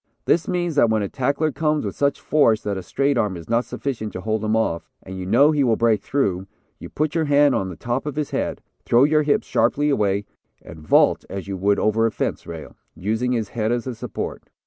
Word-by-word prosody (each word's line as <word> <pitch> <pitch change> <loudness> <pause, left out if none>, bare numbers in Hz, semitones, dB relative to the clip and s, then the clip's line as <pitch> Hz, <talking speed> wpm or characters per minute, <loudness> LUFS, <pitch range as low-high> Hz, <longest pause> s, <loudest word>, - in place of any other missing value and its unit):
This 170 - +2
means 175 -2 -1
that 120 -5 +5
when 110 -1 +1
a - - -2
tackler 140 +6 0
comes 150 0 0
with - - -4
such 140 0 0
force 115 -8 +2
that 100 -1 -2
a 95 - -4
straight 140 +6 0
arm 105 -5 -1
is 85 - -11
not 115 +1 +1
sufficient 115 -6 -4
to 90 - -5
hold 110 +1 -2
him 110 +1 +1
off, 85 -7 -1
and 95 - -8
you 95 -1 -6
know 145 +10 +5
he 150 -2 +2
will 120 -4 +3
break 115 -2 +2
through, 95 -9 -1 0.3
you - - -9
put 155 0 -1
your 165 -2 +1
hand 145 -1 +4
on 95 - -1
the 90 - -7
top 120 - -3
of 145 - -4
his 150 -1 -3
head, - - -3 0.2
throw 120 +2 +4
your 150 +1 +4
hips 145 -1 +1
sharply 145 +1 +1
away, 100 -5 +1 0.4
and 80 0 -11
vault 75 - +3
as 95 0 -6
you 100 - -3
would 100 +2 +1
over 110 +1 +2
a - - -2
fence - - -3
rail, 80 -2 -8 0.2
using 110 +6 -1
his 110 -4 -2
head 110 -1 -1
as 120 -1 -1
a 130 - -4
support. 115 -1 -6
115 Hz, 235 wpm, -22 LUFS, 100-145 Hz, 0.4 s, that